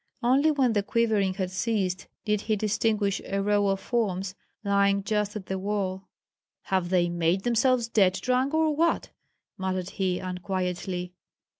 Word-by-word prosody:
Only 270 +6 +4
when 270 -6 +2
the 205 - +2
quivering 205 -3 +1
had 185 -2 -2
ceased 185 -2 -1 0.2
did 210 -2 +1
he 215 0 0
distinguish 210 -1 0
a 195 - -2
row 205 0 +2
of 195 0 +1
forms 195 -6 -1 0.3
lying 200 -1 +2
just 210 0 -1
at 205 -3 -5
the 190 0 -3
wall. 190 -1 -3 0.5
"Have 185 -2 0
they 175 -1 +3
made 175 +2 0
themselves 240 0 +2
dead 200 -5 +3
drunk 255 +7 0
or 315 -1 +2
what?" 335 +2 +1 0.5
muttered 185 -1 -2
he, 185 -2 -1
unquietly. 180 -1 -3
200 Hz, 150 wpm, -27 LUFS, 185-225 Hz, 0.5 s, Only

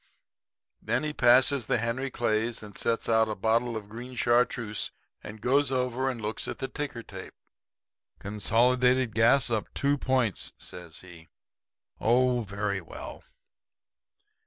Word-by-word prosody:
Then 120 +6 -1
he 150 0 -2
passes 125 0 +4
the - - +2
Henry 120 +4 -2
Clays 115 -2 -1
and 105 -2 -11
sets 115 - -1
out 110 -1 +3
a 110 - -2
bottle 115 +3 +1
of 105 -2 -8
green 120 +4 -9
chartreuse, 120 -2 +1 0.3
and 110 +1 -9
goes 135 +4 +2
over 130 0 0
and 125 -3 -4
looks 110 0 -4
at - - -5
the 135 - -3
ticker 140 -6 -5
tape. 95 -3 -10 0.8
"'Consolidated 125 +4 +2
Gas 120 +3 +4
up 110 -2 -1
two 140 0 +1
points,' 130 -7 0
says 90 -3 -9
he. 85 -3 -14 0.7
'Oh, 125 +1 +3
very 100 -1 -3
well.' 80 - -9
115 Hz, 135 wpm, -28 LUFS, 105-125 Hz, 0.8 s, passes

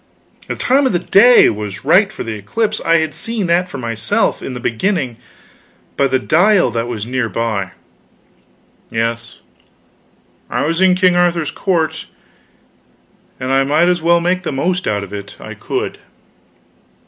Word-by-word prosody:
The - - -3
time 270 +2 +2
of 255 - -1
the - - +3
day 235 +8 +6
was 105 0 -7
right 195 +7 +4
for - - -6
the 115 - -5
eclipse; 215 - -2
I 165 - +3
had 160 -2 -1
seen 225 -3 -3
that 175 +1 +1
for - - -7
myself, 115 -3 -1
in 130 - -6
the - - -5
beginning, 125 - -1 0.8
by 140 - +2
the 130 0 +1
dial 175 - +3
that 115 +1 -2
was 110 -4 -4
near 125 -1 -2
by. 110 -5 -2 1.2
Yes, 115 +1 -3 1.1
I - - -1
was 165 +3 -1
in 185 -1 +5
King 180 -1 +3
Arthur's 170 -4 +1
court, 170 -4 -1 1.3
and 130 +1 -3
I 135 0 +3
might 155 +5 +2
as 175 -1 0
well 170 +1 +3
make 180 +2 0
the 175 - -4
most 175 +7 -1
out 100 -1 -1
of 100 0 -10
it 100 -1 -8
I - - -8
could. - - -4
155 Hz, 160 wpm, -17 LUFS, 115-180 Hz, 1.3 s, day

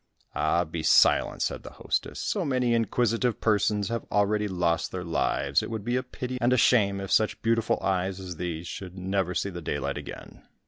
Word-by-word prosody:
"Ah, 85 - +1
be 85 0 -5
silent," - - +4
said - - -2
the - - -11
hostess, - - -3
"so - - -1
many 125 -3 +1
inquisitive 115 0 +1
persons 105 -2 +1
have 115 -1 -2
already 105 +1 +2
lost 90 -3 0
their 90 -1 -4
lives, 85 -2 +1
it - - -5
would 110 -3 -5
be 120 +1 0
a 130 - +1
pity 125 0 -6
and 120 +1 +3
a 125 - +4
shame 100 -6 +3
if 95 0 -6
such 110 - +2
beautiful 115 -1 +1
eyes 95 0 0
as 90 -3 -7
these 85 -1 -4
should 95 +1 -7
never 95 -1 -1
see 100 - -1
the 85 -1 -7
daylight 80 - -3
again." - - -10
100 Hz, 195 wpm, -27 LUFS, 90-115 Hz, -, silent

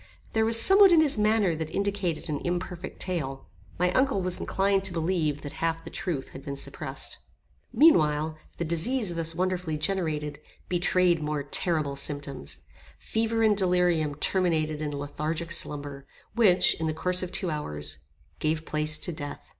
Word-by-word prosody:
There 220 0 +2
was 230 0 +5
somewhat 390 - +7
in 335 - +6
his 290 -8 +2
manner 210 -4 +3
that 160 0 -4
indicated 200 -4 -2
an 150 -3 -3
imperfect 180 +1 -4
tale. 145 -8 -3 0.3
My 180 +1 +2
uncle 260 -1 +2
was 180 0 +1
inclined 195 0 +1
to 190 - 0
believe 160 -4 -1
that 145 - -6
half 165 0 -1
the 165 - -9
truth 155 -8 -3
had 135 - -10
been 140 0 -5
suppressed. - - -4 0.5
Meanwhile, 155 - +4 0.2
the 170 - -2
disease 180 +5 +1
thus 165 -1 -2
wonderfully 180 -3 -1
generated, 155 -5 -2 0.3
betrayed 175 -1 +2
more 150 -1 -2
terrible 150 -1 +1
symptoms. 140 - -5 0.4
Fever 225 0 -1
and 215 -1 +4
delirium 180 -6 +2
terminated 155 -2 +1
in 150 - -2
lethargic 155 +4 -4
slumber, 145 -3 -3 0.3
which, 185 -6 +5
in 160 - -1
the 155 - -2
course 180 +3 +1
of 180 -1 -4
two 185 -2 +1
hours, 75 - -4 0.4
gave 155 +1 -1
place 155 0 -2
to 175 - -4
death. 145 -3 -7
165 Hz, 160 wpm, -27 LUFS, 150-185 Hz, 0.5 s, somewhat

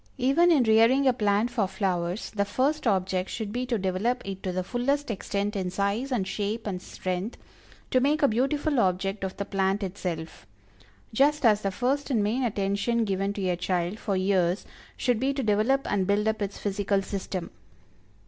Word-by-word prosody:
Even 275 +7 +4
in 290 -6 +5
rearing 230 +5 +4
a 260 - +5
plant 210 +1 +1
for 220 -5 +1
flowers, 185 -1 -2
the 200 -2 0
first 260 +8 0
object 185 -2 0
should 220 -3 -4
be 250 +3 -2
to 240 -2 0
develop 195 +6 -1
it 195 -1 -5
to 185 - -2
the 185 0 -2
fullest 255 +6 -1
extent 205 0 -2
in 185 -2 -1
size 200 +8 -1
and 210 -7 0
shape 210 +3 -3
and 185 -3 -3
strength 185 +4 -4 0.5
to 255 - +4
make 290 +4 +2
a - - +7
beautiful 275 +4 +1
object 195 0 0
of 190 -1 -4
the 200 - -3
plant 195 0 0
itself; 175 -4 -5 0.7
just 285 +3 +3
as 210 -2 +5
the 195 - 0
first 260 +9 -1
and 230 -6 +2
main 225 +6 0
attention 205 +1 0
given 195 0 -1
to 200 -2 -3
a 180 - +1
child, 180 +3 -1
for 200 -3 -1
years, 185 -1 +1 0.3
should 245 -4 +1
be 270 +2 0
to 270 - -1
develop 220 +6 +2
and 195 -2 0
build 205 +1 +2
up 220 0 0
its 200 -1 -3
physical 200 -1 0
system. 190 -2 -4
205 Hz, 185 wpm, -27 LUFS, 190-245 Hz, 0.7 s, a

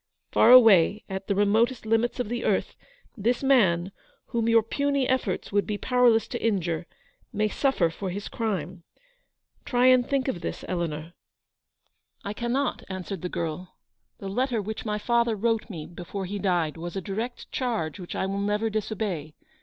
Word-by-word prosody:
Far - - +5
away 215 -5 +7
at 190 0 -5
the 200 - +1
remotest 220 +5 +2
limits 225 +3 +1
of 245 - -1
the 240 +2 -3
earth, - - 0 0.4
this 240 +4 0
man, 190 -10 +3 0.4
whom 230 -1 0
your 230 -1 +5
puny 280 +3 0
efforts 250 -8 -1
would 205 0 +1
be 210 - -2
powerless 245 -1 +3
to - - -4
injure, 175 -6 0 0.4
may 215 +1 +1
suffer 210 - +1
for 190 +3 -5
his 200 +3 -5
crime. 185 -6 -3 0.8
Try 245 0 +1
and 255 -1 +6
think 275 +1 -1
of 185 -10 -2
this, - - -5
Eleanor." 165 -4 -2
li 165 - -15 1.1
I 200 - -4
cannot!' 245 +4 -1
answered 190 -1 -5
the 180 - -3
girl. 170 +2 -4 0.4
"The 195 - -7
letter 245 +4 0
which 215 +2 -5
my 210 -1 -1
father 235 +1 +1
wrote 225 +2 0
me 160 -7 -6
before 180 +3 -6
he 200 +2 -4
died 175 -5 0
was 175 +2 -6
a 195 - -2
direct 220 +7 -5
charge 225 -10 -2
which 180 - -7
I - - -1
will 195 +1 -2
never 210 +2 0
disobey. 205 -8 -3
210 Hz, 170 wpm, -26 LUFS, 185-235 Hz, 1.1 s, away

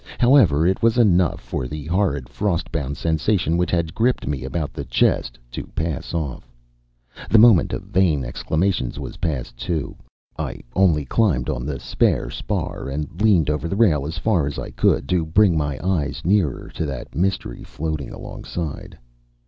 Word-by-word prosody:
However, 120 - +5
it 95 +2 +1
was 115 +1 +3
enough 90 -7 +3
for 65 - -4
the 75 +2 -6
horrid, 85 -7 0
frost 95 -5 -2
bound 70 -3 -3
sensation 85 +2 +1
which 90 +1 +1
had 85 -2 0
gripped 120 +3 +1
me 70 -3 -3
about 70 +3 -3
the - - -5
chest - - +1
to - - -6
pass 80 -3 -3
off. 70 -6 -4 0.8
The 115 - +5
moment 110 -5 +6
of - - -4
vain 80 -8 +1
exclamations 80 +2 -1
was - - -7
past, 70 -7 -3
too. 80 +1 -3 0.4
I - - -4
only 85 -7 +3
climbed 70 - +1
on 60 +3 -4
the 70 -2 -3
spare - - 0
spar - - -3
and 75 +6 -5
leaned 90 -9 +4
over 75 +1 -2
the 95 - -2
rail 80 -11 +3
as 80 +3 -5
far 85 -5 +1
as 70 - -4
I - - -5
could, 65 - +1
to 90 -2 +2
bring 90 +3 +3
my 75 -3 -1
eyes 75 -5 -1
nearer 90 -8 +1
to 80 - -2
that 70 -4 -6
mystery 90 -8 -1
floating 75 -3 -4
alongside. 80 -5 -6
80 Hz, 170 wpm, -22 LUFS, 70-95 Hz, 0.8 s, moment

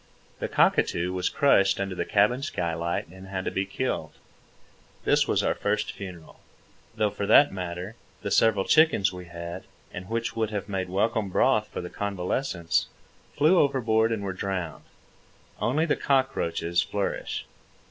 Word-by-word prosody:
The - - -2
cockatoo 90 +1 +2
was 90 -1 0
crushed 100 -11 +3
under 95 -1 -2
the - - -2
cabin 105 +6 +2
skylight 85 - -2
and 95 +2 -12
had 95 -1 -4
to - - -1
be 95 0 -1
killed. 95 - -3 0.9
This - - +3
was - - +1
our - - +2
first 105 +1 -1
funeral—though 95 +3 -7
for 100 - -4
that 140 +7 +7
matter, 90 +2 -5 0.3
the - - -3
several 110 -4 +3
chickens 155 - +4
we 90 0 -8
had, 85 +1 -7 0.3
and 90 +1 -7
which 115 +1 -2
would 110 -2 0
have 105 -3 -4
made 95 -2 -3
welcome 105 +2 0
broth - - +2
for - - -6
the 90 - -7
convalescents, 95 - -1 0.5
flew 155 +5 +5
overboard 115 -5 +2
and 110 -3 -2
were 95 -1 -3
drowned. 95 -4 -4 0.7
Only 150 +7 +1
the 160 - +1
cockroaches 85 - +1
flourish. 100 0 -3
100 Hz, 150 wpm, -26 LUFS, 90-110 Hz, 0.9 s, that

